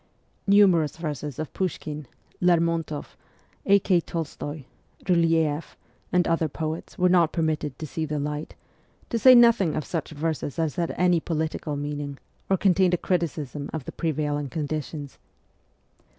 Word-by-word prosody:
Numerous 190 -7 +5
verses 150 -4 -4
of 155 -1 -5
Pushkin, 155 -5 -3 0.3
Lermontoff, 165 -3 +1 0.5
A. 200 - +7
K. 185 -2 +2
Tolstoy, 155 -3 -5 0.4
Byleeff, 165 -3 +1 0.4
and 180 -1 +3
other 165 -1 +1
poets 155 +3 -5
were 180 - +4
not 175 -3 +4
per 165 - -1
mitted 150 -4 -1
to 155 - -5
see 160 +1 -3
the 150 0 -3
light; 150 +1 -4 0.6
to 230 - 0
say 255 +3 +8
nothing 235 -9 +5
of 155 - -2
such 165 -4 -3
verses 155 -1 -3
as 160 -3 -1
had 170 -1 0
any 180 -1 +3
political 160 -2 -2
meaning 145 -1 -4 0.3
or 190 - +3
contained 185 -1 +3
a - - -2
criticism 155 -6 -2
of 155 -5 -4
the - - -6
prevailing 150 -3 -2
conditions. 150 0 -4
160 Hz, 145 wpm, -25 LUFS, 150-175 Hz, 0.6 s, say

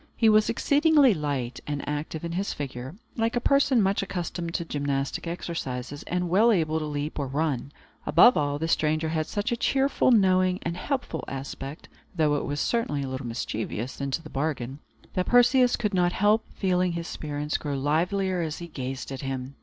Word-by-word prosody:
He 225 - +4
was 215 0 +4
exceedingly 290 0 +4
light 140 -6 -3
and 145 -1 -3
active 150 +2 -3
in 170 - -4
his 190 +4 -2
figure, 135 +1 -6 0.2
like 225 +1 0
a - - +3
person 270 -3 +3
much 195 +1 +1
accustomed 175 -3 -4
to 170 - -1
gymnastic 140 0 -2
exercises, 145 -6 -4
and 180 0 -1
well 210 +7 +4
able 160 -5 +1
to 155 - -3
leap 150 +1 -3
or 140 - -1
run. 140 -1 -1 0.4
Above 240 +10 +7
all, 145 -1 0
the 160 +2 -2
stranger 155 0 +1
had 155 -1 -1
such 210 +4 -2
a - - +2
cheerful, 270 +3 +2
knowing, 185 -5 +4
and 170 +1 -2
helpful 265 +7 -3
aspect 135 +2 -6 0.3
(though 155 -3 +2
it 145 - -1
was 145 +1 -3
certainly 150 -12 0
a - - -4
little 130 -1 -5
mischievous, 115 +2 -4
into 140 +4 -2
the - - -10
bargain), 135 -2 -2 0.3
that 185 - -1
Perseus 245 +1 +5
could 210 -3 -2
not 175 -1 +2
help 210 +2 +3
feeling 180 -2 +1
his 170 0 -4
spirits 150 0 -3
grow 145 -2 -3
livelier 180 +6 0
as 160 -2 -3
he 170 - -7
gazed 135 -2 -5
at 135 - -5
him. 135 0 -4
160 Hz, 185 wpm, -26 LUFS, 145-195 Hz, 0.4 s, Above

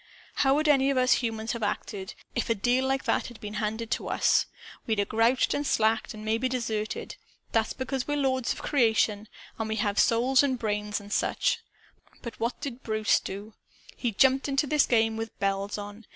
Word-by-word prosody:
"How 270 -1 +4
would 305 +1 +1
any 275 -2 +4
of 275 - +1
us 255 +1 +4
humans 225 -1 -2
have 235 - -4
acted, 200 -2 -3 0.2
if 240 - -2
a 230 - +3
deal 245 +5 +1
like 270 0 0
that - - 0
had 240 -3 -12
been 210 0 -7
handed 220 +2 -3
to - - -1
us? - - +3 0.4
We'd 220 -2 0
'a' 200 - +2
grouched 230 +4 +2
and 290 - -1
slacked 225 -3 +1
and 215 0 -9
maybe 225 +4 0
deserted. 225 -4 -3 0.3
That's 225 -1 +1
because 260 -1 -3
we're 290 0 0
lords 260 -3 +1
of - - -5
creation 220 -5 +2 0.3
and 220 -1 -2
have 205 -1 0
souls 245 +3 +4
and 270 -3 +1
brains 210 -2 -2
and 205 0 -8
such. - - +1 0.8
What 235 +2 -2
did 265 -4 -5
Bruce 215 -1 +2
do? 205 +3 -7 0.4
He 240 - -1
jumped 265 +6 +3
into 275 +1 +2
this 300 0 +3
game, 225 -2 +2
with 225 0 -6
bells 195 +1 -1
on. 205 +1 -9
230 Hz, 190 wpm, -27 LUFS, 215-260 Hz, 0.8 s, How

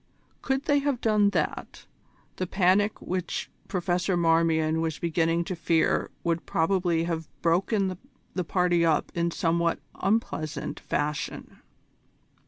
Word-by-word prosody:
Could 270 0 -1
they 290 0 +3
have 280 -3 0
done 210 -3 +3
that, 165 -6 -3 0.5
the 185 - -2
panic 195 +3 +2
which 185 -1 -3 0.2
Professor 180 0 0
Marmion 165 -1 +2
was 160 -2 -2
beginning 170 0 +1
to 185 - -4
fear 165 -1 +1
would 170 0 -1
probably 170 -1 +1
have 165 -2 -3
broken 190 +3 +1 0.4
the 180 - -1
party 175 0 +2
up 160 -2 +2
in 170 0 0
somewhat 170 -1 +1 0.2
unpleasant 165 -7 -2
fashion. 150 0 -3
170 Hz, 120 wpm, -27 LUFS, 165-190 Hz, 0.5 s, they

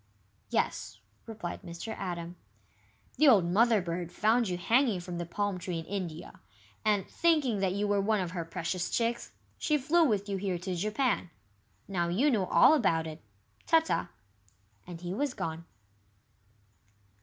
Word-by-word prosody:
"Yes," - - -1 0.3
replied 215 -6 -6
Mr. 170 +6 -7
Atom. 175 -2 -5 0.8
"The 310 - +5
old 210 -10 +6
Mother 215 +3 +3
bird 170 0 -4
found 220 +3 +2
you 180 - -2
hanging 230 +2 +2
from 175 0 -6
the 175 - -4
palm 200 +1 -2
tree 175 -1 -4
in 165 - -5
India, 175 -5 -6 0.4
and, 210 -3 +1
thinking 300 -10 +2
that 190 -1 +1
you 205 +1 -1
were 205 -1 +2
one 215 +1 +1
of 180 -2 -3
her 175 -2 -3
precious 170 +2 -3
chicks, 235 0 -1 0.3
she 305 - +2
flew 320 +5 +3
with 210 -8 +1
you 200 -1 -2
here 190 -2 -2
to 185 +2 -4
Japan. 210 +2 0 0.6
Now 175 -3 -1
you 235 +13 +2
know 200 -6 +1
all - - +6
about 165 - +2
it. 160 0 -8 0.5
Ta 325 0 +6
ta." 320 - -2 0.8
And 175 -2 -8
he 180 0 -4
was 275 +4 -1
gone. 165 +1 -4
195 Hz, 160 wpm, -30 LUFS, 175-230 Hz, 0.8 s, old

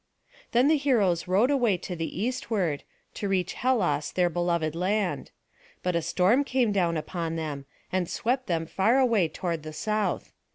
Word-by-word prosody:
Then 245 +3 +4
the 310 +1 +4
heroes 215 - +2
rowed 205 +9 +3
away 240 -9 +2
to 180 0 -6
the 165 +1 -4
eastward, 215 - -1 0.3
to 205 - -3
reach 185 -2 0
Hellas 180 - +1
their 180 -1 +1
beloved 170 -2 0
land; 180 -4 -1 0.5
but 180 -1 0
a 170 - +2
storm 185 - +3
came 255 -5 +1
down 175 -4 +1
upon 165 +1 -3
them, 150 -4 -4 0.2
and 185 -2 0
swept 255 +2 -1
them 165 -2 0
far 195 +9 +2
away 230 -9 +3
toward 170 0 -3
the 155 0 -8
south. 215 +5 -2
185 Hz, 165 wpm, -27 LUFS, 170-230 Hz, 0.5 s, Then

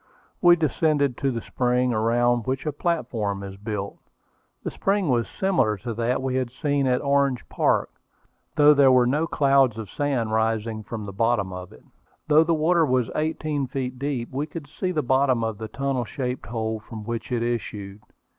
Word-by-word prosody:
We 175 -1 +7
descended 150 -4 +1
to 135 - +1
the 115 -3 -3
spring, 125 0 +1
around 120 +1 +1
which 130 +2 -2
a 150 - 0
platform 115 - -2
is 95 0 -7
built. 100 -1 -5 0.6
The - - -3
spring 195 -4 0
was 120 -3 +1
similar 180 - +2
to 115 +4 -5
that 120 +3 -1
we 130 -1 0
had 130 -2 -1
seen 140 +1 0
at 125 0 +1
Orange 140 -2 +1
Park, - - +1 0.6
though 150 0 +7
there 140 -2 +5
were 125 -1 +5
no 150 +6 +1
clouds 135 -6 +3
of 110 -3 -7
sand 130 -6 -1
rising 110 0 0
from 110 0 -6
the 100 - -7
bottom 105 -2 +1
of 90 0 -8
it. 65 - -16 0.4
Though 155 +1 +6
the 165 0 +1
water 165 +2 +3
was 125 -7 +1
eighteen 155 -2 -1
feet 125 -1 -4
deep, 135 -4 -3
we 140 +3 -2
could 160 -3 -8
see 160 +5 -4
to 180 - -1
the 155 -3 0
bottom 130 -2 +2
of 110 -2 -3
the 110 - -5
tunnel 135 +1 -2
shaped 125 0 -4
hole 110 -1 -2
from 110 0 -9
which 115 0 -5
it 120 -2 0
issued. 105 -4 -4
125 Hz, 190 wpm, -24 LUFS, 110-145 Hz, 0.6 s, We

